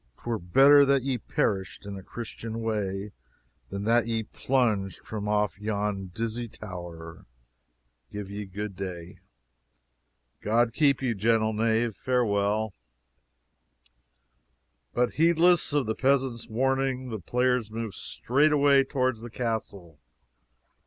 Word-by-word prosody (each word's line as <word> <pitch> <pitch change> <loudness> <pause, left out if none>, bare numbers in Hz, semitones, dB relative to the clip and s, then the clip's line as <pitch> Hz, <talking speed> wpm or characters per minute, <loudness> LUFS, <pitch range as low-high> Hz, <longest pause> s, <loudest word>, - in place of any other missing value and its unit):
'Twere 115 -2 -2
better 135 +12 +6
that 140 -2 +3
ye 130 -2 -1
perished 95 -1 -2
in 100 -1 -6
a 95 - -7
Christian 115 +2 -6
way 105 -2 -2 0.6
than 100 +1 -4
that 115 +1 +3
ye 115 -1 -1
plunged 110 -6 -1
from 105 -1 -5
off 105 -1 0
yon 105 -2 -2
dizzy 115 +5 -3
tower. 85 - -9 0.8
Give 105 -1 -5
ye 105 +1 -5
good 100 +1 -5
day." 90 -2 -7 1.2
"God 115 +2 +2
keep 140 -1 +2
ye, 125 -3 +1
gentle 110 +1 +2
knave 110 0 +1
farewell." 110 -4 0 2.2
But 120 -1 +1
heedless 170 0 +4
of 145 -2 +1
the 110 - -1
peasant's 130 -2 +1
warning, 130 +2 0
the 110 -2 -4
players 125 +3 0
moved 110 -2 -5
straightway 140 +1 +3
toward 130 -3 0
the 120 +2 -9
castle. 105 - -4
110 Hz, 120 wpm, -27 LUFS, 100-125 Hz, 2.2 s, better